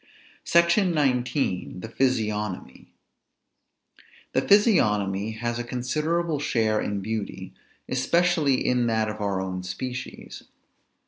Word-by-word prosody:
SECTION 170 +2 +3
XIX. 125 - 0
THE 115 - -7
PHYSIOGNOMY. 105 - -2 1.5
The - - +3
physiognomy 105 - +3
has 120 +1 -3
a - - -2
considerable 150 +7 -1
share 110 -6 +1
in 100 -1 -2
beauty, 110 0 -5 0.3
especially 155 0 +2
in 125 -1 +2
that 110 -1 +1
of 105 0 -6
our 100 -2 -1
own 95 -1 -3
species. 125 +8 -7
120 Hz, 105 wpm, -25 LUFS, 105-145 Hz, 1.5 s, SECTION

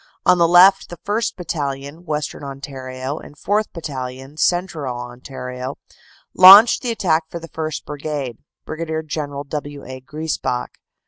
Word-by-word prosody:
On 180 -1 +5
the 170 - +5
left 185 +3 +6
the 175 - -8
1st. 215 +7 -2
Battalion, 145 -2 -5
Western 150 -2 -3
Ontario, 135 0 -6
and 150 - -14
4th. 210 +6 0
Battalion, 135 -3 -7
Central 160 -7 -1
Ontario, 125 +1 -7 0.6
launched 195 +5 +9
the 245 - -3
attack 170 -8 +1
for - - -6
the 165 0 -10
1st. 155 -1 -4
Brigade, 145 -5 -5 0.3
Brig. 160 0 -4
General 145 -2 -4
W. 145 0 -6
A. 130 0 -8
Griesbach. 135 -3 -3
150 Hz, 135 wpm, -20 LUFS, 135-170 Hz, 0.6 s, launched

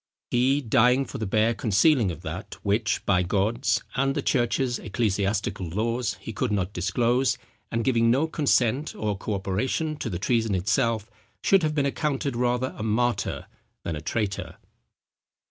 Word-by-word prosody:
He, 130 +4 +3
dying 125 +2 +3
for 135 - -7
the 110 - -2
bare 110 +3 +2
concealing 115 - +3
of 85 - -7
that, - - -6
which, 105 +2 0
by 90 -3 +3
God's, 105 +8 0
and 135 +1 +1
the - - -1
church's 120 0 +1
ecclesiastical 100 -3 -1
laws, 115 +6 -1
he 115 - -7
could 125 +2 -1
not 100 -1 -1
disclose, 120 +8 +1 0.3
and 115 0 -1
giving 115 -3 +3
no 135 +6 +3
consent 145 -3 +1
or 105 -1 -1
co 100 +2 -3
operation 125 - -1
to 125 - -4
the 90 - -3
treason 110 +1 +1
itself, 110 +3 +1 0.4
should 195 -1 +5
have 155 -1 0
been 145 -2 +2
accounted 140 -2 -1
rather 125 +1 0
a - - -7
martyr 115 +3 0 0.4
than 85 - -3
a 75 - -6
traitor." 100 +3 -3
115 Hz, 160 wpm, -26 LUFS, 105-130 Hz, 0.4 s, should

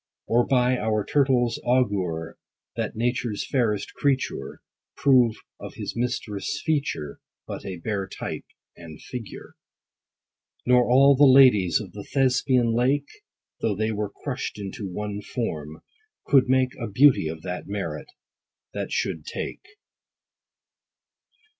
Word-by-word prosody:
Or, 120 +1 +2
by 125 -1 +3
our 110 -1 0
Turtle's 130 -4 +2
augure, 100 -10 0 0.4
That - - -3
nature's 120 -2 -1
fairest 115 -7 0
creature 135 -2 -2 0.3
Prove 125 -5 +4 0.2
of - - -9
his - - -5
mistress' 120 0 -3
feature 140 - -2 0.3
But - - -7
a 95 -2 -5
bare 100 +2 -3
type - - -6 0.3
and 80 -2 -11
figure. 120 -5 -9 1.1
Nor 125 0 +4
all 135 +3 +6
the 145 +2 +6
ladies 125 -10 +6
of 105 -4 -8
the 100 - -8
Thespian 125 -2 +2
lake, 135 +5 +1 0.5
(Though 105 -3 0
they 110 +2 -1
were 105 -1 -2
crushed 130 +4 -5
into 100 0 -6
one 105 +2 -4
form) 80 - -5 0.4
could 135 -3 +4
make 130 -1 +2
A 115 - -3
beauty 125 - +4
of 80 0 -6
that 90 0 -5
merit, 100 0 -4 0.7
that - - -4
should - - -2
take. - - -6
120 Hz, 125 wpm, -25 LUFS, 100-130 Hz, 1.1 s, all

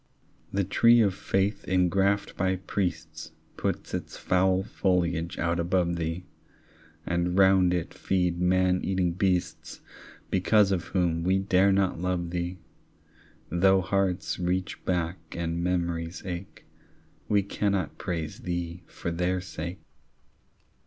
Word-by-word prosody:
The 100 0 +1
tree 115 +5 +5
of 100 -3 +3
faith 95 +2 -1
ingraffed 95 +2 +2
by 95 0 +1
priests 90 -4 -4 0.2
Puts - - -3
its - - -4
foul 95 +1 +2
foliage 85 -4 0
out 85 0 0
above 85 0 +1
thee, 85 +1 -3 0.8
And 90 +1 0
round 95 -2 +5
it 90 -2 -2
feed 90 -2 0
man 90 0 +3
eating 95 -2 +1
beasts 90 0 -1 0.5
Because 100 +2 +4
of 90 -3 0
whom 85 -3 0
we 95 +2 +3
dare 95 0 +3
not 95 -3 +1
love 90 -2 -1
thee; 90 +1 -3 0.9
Though 95 +3 +4
hearts 95 -2 -1
reach 90 +1 -2
back 90 -1 -1 0.2
and 85 0 -2
memories 85 -1 -2
ache, 90 0 -7 0.6
We 100 -1 +3
cannot 100 -4 -1
praise 85 +4 -4
thee 85 -5 -4
for 85 - -5
their 90 +2 0
sake. 85 0 -6
90 Hz, 125 wpm, -27 LUFS, 85-95 Hz, 0.9 s, tree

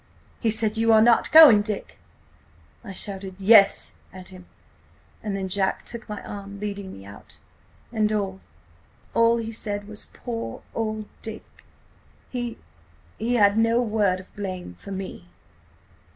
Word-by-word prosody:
He 230 - +1
said: 220 0 +1
'You 225 0 +3
are 220 - +7
not 235 0 +4
going, 295 -10 +9
Dick?' 210 -1 -5 0.8
I 210 - -8
shouted 190 -1 -6
'Yes,' 200 0 +5 0.2
at 185 -1 -10
him, 185 -1 -13 0.7
and 210 -2 -3
then 190 -1 -3
Jack 190 +1 -1
took 235 -1 -7
my 210 - -6
arm, 200 0 -8
leading 200 -2 -5
me 95 - -11
out. 100 0 -13 0.5
"And–and 210 -4 -1 0.7
all 230 0 +4
he 225 -1 -4
said 205 -2 -4
was: 210 -1 -5
'Poor 230 - -6
old 215 -1 -3 0.2
Dick!'... 220 -1 -9 0.7
He–he 85 - -6
had 205 -1 +4
no 230 +1 +3
word 210 -5 +1
of 185 - -15
blame 185 - -5
for 90 - -13
me. 190 - -7
205 Hz, 135 wpm, -24 LUFS, 190-225 Hz, 0.8 s, going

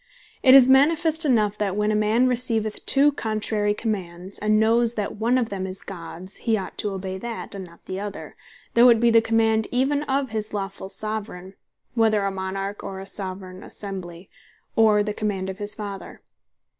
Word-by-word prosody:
It 260 0 +7
is 265 -2 +9
manifest 315 +4 +4
enough, 215 -6 +2
that 200 -2 -1
when 210 +1 +1
a - - +1
man 215 +4 +3
receiveth 230 -4 0
two 285 +2 +4
contrary 215 -4 -1
Commands, 190 -4 -4
and 215 0 +2
knows 230 +1 +3
that 210 -1 -3
one 235 +4 +2
of 235 -3 0
them 190 -1 -4
is 190 0 -7
Gods, 185 0 -8
he 225 -2 0
ought 190 - -6
to 210 - -1
obey 190 -1 -5
that, 235 +1 -6
and 195 -2 -6
not 170 0 -19
the 185 0 -5
other, 205 -1 -7 0.4
though 240 +1 +7
it 230 -2 +5
be 235 0 +4
the 230 0 +6
command 225 -1 +2
even 270 +3 +1
of 270 -2 0
his 215 -1 -4
lawfull 195 -1 -5
Soveraign 200 -3 -5 0.4
(whether 220 -4 +2
a 195 - 0
Monarch, 195 +1 -4
or 190 -1 -6
a 190 - -7
Soveraign 185 -1 -7
Assembly,) 185 -4 -8 0.5
or 215 -2 +4
the 210 0 -3
command 195 -3 -2
of 190 - -12
his 205 0 -2
Father. 200 -2 -7
210 Hz, 185 wpm, -24 LUFS, 195-230 Hz, 0.5 s, is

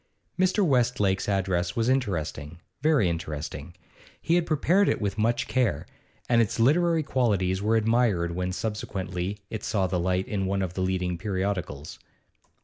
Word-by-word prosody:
Mr. 185 +2 +3
Westlake's 120 - +1
address 90 -3 0
was 115 0 +1
interesting, 85 - -1 0.2
very 150 - +3
interesting; 80 -1 -5 0.4
he 165 - 0
had 175 -1 +2
prepared 175 +6 +3
it - - 0
with 100 -2 -2
much 115 +2 +1
care, 120 - 0 0.4
and 115 -1 +4
its 115 0 -1
literary 160 +6 +3
qualities 100 -9 +1
were 110 +2 +2
admired 110 -6 +2
when 90 +1 -2
subsequently 95 -2 -3
it 110 - -5
saw 95 -3 0
the 90 -1 -1
light 90 +2 0
in 95 -2 -2
one 95 0 0
of 90 -2 -4
the 95 - -3
leading 90 -2 -1
periodicals. 95 -7 -3
100 Hz, 150 wpm, -26 LUFS, 90-120 Hz, 0.4 s, and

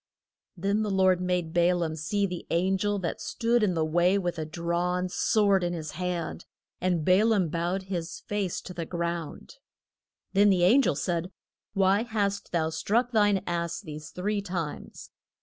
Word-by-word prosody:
Then 200 +4 0
the 215 - -1
Lord 190 -2 +3
made 180 -3 -1
Ba 175 +1 +4
laam 165 -3 -2
see 200 +6 0
the 180 -2 -5
an 185 +3 +2
gel 205 0 0
that 180 -4 -3
stood 235 +1 +1
in 195 -4 +2
the 160 -1 +1
way 175 +4 +3
with 175 -3 -2
a 155 - -3
drawn 175 +2 -1
sword 200 0 +2
in 175 0 -1
his 155 -3 -5
hand, 180 -2 -4 0.3
and 175 -4 0
Ba 185 +3 +5
laam 210 -7 +2
bowed 175 +4 -1
his 175 -3 -5
face 205 -4 -2
to 180 - -9
the 170 -2 -5
ground. 170 - -4 0.8
Then 205 +1 +5
the 185 -3 +3
an 230 +10 +6
gel 205 - +1
said, 170 +4 -2 0.5
Why 195 +1 +3
hast 205 -4 -2
thou 160 -2 0
struck 230 +9 0
thine 205 -4 +3
ass 170 -1 -2
these 150 -1 -8
three 205 +3 -2
times? 175 -6 -6
180 Hz, 175 wpm, -27 LUFS, 170-200 Hz, 0.8 s, an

